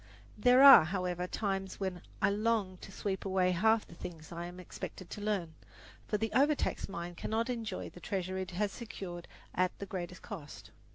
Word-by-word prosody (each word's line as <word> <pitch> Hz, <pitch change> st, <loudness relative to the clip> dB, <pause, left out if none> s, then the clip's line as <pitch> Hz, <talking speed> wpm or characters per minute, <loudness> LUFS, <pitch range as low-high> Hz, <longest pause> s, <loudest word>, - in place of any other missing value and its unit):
There 250 Hz, +5 st, +6 dB
are, 275 Hz, -, +11 dB
however, 180 Hz, 0 st, -2 dB
times 195 Hz, -1 st, -2 dB
when 190 Hz, -3 st, -3 dB, 0.2 s
I -, -, +5 dB
long 210 Hz, -3 st, 0 dB
to 195 Hz, -, -11 dB
sweep 195 Hz, 0 st, -3 dB
away 185 Hz, -1 st, +2 dB
half 220 Hz, +5 st, +3 dB
the -, -, -13 dB
things 165 Hz, -1 st, -9 dB
I 170 Hz, 0 st, -5 dB
am 180 Hz, +1 st, -10 dB
expected 180 Hz, 0 st, -8 dB
to 210 Hz, -, -6 dB
learn; 200 Hz, -6 st, -1 dB, 0.5 s
for 210 Hz, -, +1 dB
the 225 Hz, +1 st, -2 dB
overtaxed 285 Hz, -3 st, +2 dB
mind 175 Hz, -1 st, -6 dB
cannot 230 Hz, +6 st, -1 dB
enjoy 225 Hz, -5 st, -4 dB
the -, -, -12 dB
treasure 190 Hz, -1 st, -3 dB
it 185 Hz, -1 st, -4 dB
has 200 Hz, +3 st, -1 dB
secured 185 Hz, -6 st, -7 dB, 0.3 s
at 185 Hz, 0 st, +1 dB
the 200 Hz, -, -5 dB
greatest 180 Hz, -2 st, -6 dB
cost. 165 Hz, -10 st, -9 dB
190 Hz, 180 wpm, -33 LUFS, 180-210 Hz, 0.5 s, are